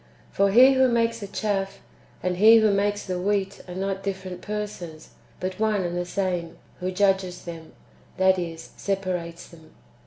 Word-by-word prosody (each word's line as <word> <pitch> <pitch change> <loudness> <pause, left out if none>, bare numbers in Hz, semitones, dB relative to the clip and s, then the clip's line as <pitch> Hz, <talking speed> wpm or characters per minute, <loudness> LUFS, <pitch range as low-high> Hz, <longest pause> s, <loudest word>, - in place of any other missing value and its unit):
"^ - - -31
For 200 0 +3
He 255 +6 +7
who 260 0 +4
makes 230 -1 +1
the 200 - -6
chaff 195 -1 -2 0.4
and 180 0 -1
He 220 +4 +8
who 220 -2 +4
makes 205 +1 0
the 185 -1 -3
wheat 200 0 -1
are 180 - -7
not 195 +1 -2
different 190 -2 -5
persons, 205 -7 -6 0.3
but 185 +1 -4
one 215 -3 +1
and 175 0 -3
the 175 0 -2
same, 180 -3 -2 0.2
who 185 0 -2
judges 190 -1 +1
them, 165 -2 -9 0.4
that 190 0 +4
is, 165 -2 -6
separates 180 -4 -3
them. 160 -2 -17
190 Hz, 175 wpm, -25 LUFS, 180-205 Hz, 0.4 s, He